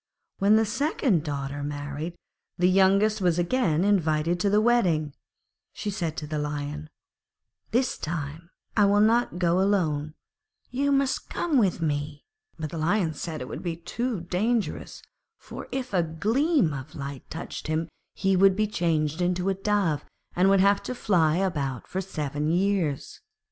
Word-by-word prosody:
When 200 +2 +5
the 220 0 +4
second 255 - +1
daughter 145 -2 -4
married, 145 +3 -4
and - - -31 0.4
the 180 - +3
youngest 195 +3 +4
was 175 -2 +2
again 175 -3 +1
invited 170 -4 +2
to 200 - +2
the 205 +1 +4
wedding, 180 -11 +2 0.6
she 210 - -4
said 170 -6 -3
to 150 - -4
the 150 0 -3
Lion, 150 +1 -4 0.8
'This 250 +2 0
time 160 +1 -5 0.3
I 210 - +5
will 200 +1 +4
not 225 -1 +3
go 175 0 +2
alone, 155 -7 0 0.6
you 280 +3 +1
must 275 -1 +1
come 300 -7 +1
too.' 150 -4 -2 0.4
But 155 -1 -5
the 165 - -4
Lion 170 0 +1
said 155 0 -5
it 125 - -5
would - - -6
be 170 -2 -3
too 225 +5 -3
dangerous, 210 +6 -2 0.3
for - - -9
if 255 -4 -4
a 180 - +4
gleam 215 - +1
of 140 +3 -7
light 140 -2 -7
touched 165 - -6
him 160 +1 -1 0.3
he 195 0 +2
would 190 +1 +5
be 215 +2 +2
changed 165 -5 0
into 180 +1 +1
a - - +2
Dove 195 -6 0 0.3
and 185 +2 +4
would 195 -1 +5
have 200 +1 +4
to 255 - -5
fly 170 -9 +2
about 150 -9 -1
for 190 - -3
seven 150 -5 -3
years. 175 -5 0
175 Hz, 160 wpm, -26 LUFS, 155-205 Hz, 0.8 s, When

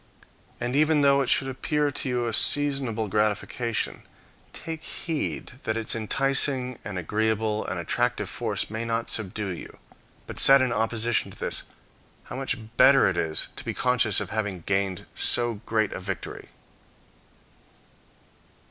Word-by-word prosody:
And 120 +2 -2
even 155 0 +4
though 140 0 +4
it 135 - -1
should 135 - +3
appear 145 +3 -1
to 135 - -3
you 125 -1 0
a 115 - -2
seasonable 135 -5 +3
gratification, 105 +3 -1 0.5
take 160 -1 -6
heed 160 -3 -4
that 110 0 -1
its 115 0 +1
enticing, 130 +2 +2
and 100 -3 -5
agreeable 110 +3 0
and 90 -1 -3
attractive 85 - -1
force - - -2
may 110 +1 -3
not 115 0 -2
subdue 105 -1 -2
you; 85 - -10 0.5
but - - -8
set 135 0 +8
in 130 -2 +1
opposition 115 +1 0
to - - -13
this - - -3 0.6
how - - -9
much 135 0 -2 0.2
better 135 -1 +7
it 95 - 0
is 80 -2 -1
to - - -5
be - - -4
conscious 125 -5 +2
of 100 -2 -5
having 105 -5 -2
gained 95 0 -1
so 120 -3 +1
great 110 -2 +1
a - - -5
victory. 95 -1 -6
115 Hz, 150 wpm, -26 LUFS, 105-135 Hz, 0.6 s, set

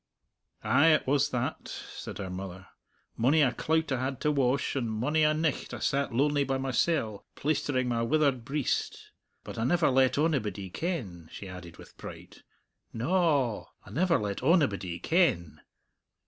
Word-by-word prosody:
"Ay, 160 - +4
it 155 -1 +4
was 145 +1 +2
that," 125 -4 -3
said - - -8
her 95 -3 -5
mother. 95 0 -7 0.5
"Mony 145 +7 +4
a 130 - +3
clout 160 -1 0
I 130 -1 0
had 130 -1 -3
to 150 - +2
wash, 140 -1 +1
and 120 -4 -1
mony 125 +9 0
a 155 0 +5
nicht 155 -3 -1
I - - -6
sat 140 0 0
lonely 140 +4 +2
by 135 0 -1
mysell, 130 -4 -1
plaistering 145 -3 0
my 120 -1 0
withered 135 0 +2
breist. 140 +2 -1 0.5
But - - -7
I - - 0
never 165 +4 +3
let 130 0 +3
onybody 110 - -1
ken," 105 - -4
she 100 - -8
added 90 -2 -10
with - - -15
pride; - - -10 0.5
"na 120 +10 -2
a 145 - +2
a, - - -16 0.2
I - - -12
never 170 +3 +2
let 100 -2 -3
onybody 120 - +2
ken. 110 - +1
130 Hz, 165 wpm, -29 LUFS, 110-150 Hz, 0.5 s, a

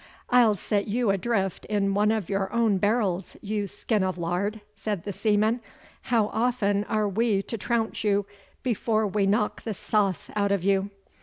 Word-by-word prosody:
'I'll 240 -4 +5
set 200 +1 -1
you 225 0 +1
adrift 195 -1 -1
in 200 -2 0
one 210 +1 +3
of 215 -6 -1
your 195 -1 -1
own 225 -4 +2
barrels, 205 -3 0
you 205 -1 -2
skin 210 +1 -1
of 185 -1 -1
lard,' 180 +5 -1 0.2
said 205 -4 -3
the 200 - -4
seaman. 215 +4 +1 0.4
'How 225 -3 +1
often 220 -4 +1
are 215 -1 0
we 205 0 +1
to 230 - -5
trounce 225 +1 -1
you 205 -1 +2 0.4
before 220 -2 +1
we 200 0 +1
knock 210 +1 +1
the 220 -3 -4
sauce 200 -2 0
out 200 -1 +1
of 200 -3 +1
you? 195 0 +2
205 Hz, 170 wpm, -26 LUFS, 195-220 Hz, 0.4 s, I'll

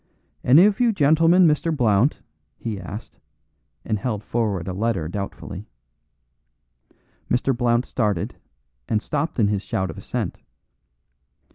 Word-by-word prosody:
"Any 150 +9 +7
of 210 -1 +2
you 240 -2 +4
gentlemen 165 +1 +4
Mr. 165 +1 +2
Blount?" 115 +2 +2 0.3
he 110 -4 -4
asked, 100 +4 -9 0.7
and 110 -2 -1
held 105 -2 -3
forward 105 -7 -1
a 95 - -3
letter 100 -5 -1
doubtfully. 100 +2 -6 1.6
Mr. 125 +2 +1
Blount 120 0 +1
started, 105 -8 -1 0.6
and 110 - +2
stopped 150 +7 -3
in 105 -4 +3
his 100 -2 0
shout 95 -3 -2
of - - -10
assent. - - -4
115 Hz, 125 wpm, -23 LUFS, 100-145 Hz, 1.6 s, Any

